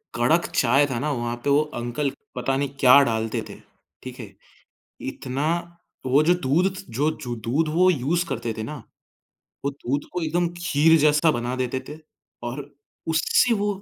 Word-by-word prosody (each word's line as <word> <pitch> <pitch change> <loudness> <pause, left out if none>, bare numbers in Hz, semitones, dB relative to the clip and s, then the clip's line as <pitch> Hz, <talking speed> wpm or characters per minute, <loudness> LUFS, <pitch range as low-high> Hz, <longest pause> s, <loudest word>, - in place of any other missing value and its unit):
कड़क 125 +9 +2
चाय 135 +5 +4
था 130 -4 -3
ना 150 +2 -1
वहाँ 120 -3 -2
पे 145 - 0
वो 145 +1 +5 0.2
अंकल 135 +4 -2 0.2
पता 135 +2 -1
नहीं 140 0 -1
क्या 130 +2 +8
डालते 110 -2 -1
थे, - - -9 0.5
ठीक 130 0 -9
है? 105 -5 -8 0.8
इतना 135 +3 -4 0.6
वो 135 +4 +4
जो 170 +3 +4
दूध 175 +3 +1
थ 195 - -7
जो 145 +6 +1
जो 120 -2 -4
दूध 125 +9 -1
वो 180 +3 +5
यूज़ 165 +4 0
करते 115 -2 -3
थे 110 - -3
ना, 150 +7 -6 0.9
वो 140 - +1
दूध 140 +1 -3
को 180 - -2
एकदम 170 +2 0
खीर 165 -1 +4
जैसा 150 +2 +4
बना 120 0 -2
देते 130 0 -2
थे 150 - -8 0.5
और 125 +4 -5 0.5
उससे 165 +8 +3
वो 205 -1 0
140 Hz, 175 wpm, -24 LUFS, 125-160 Hz, 0.9 s, क्या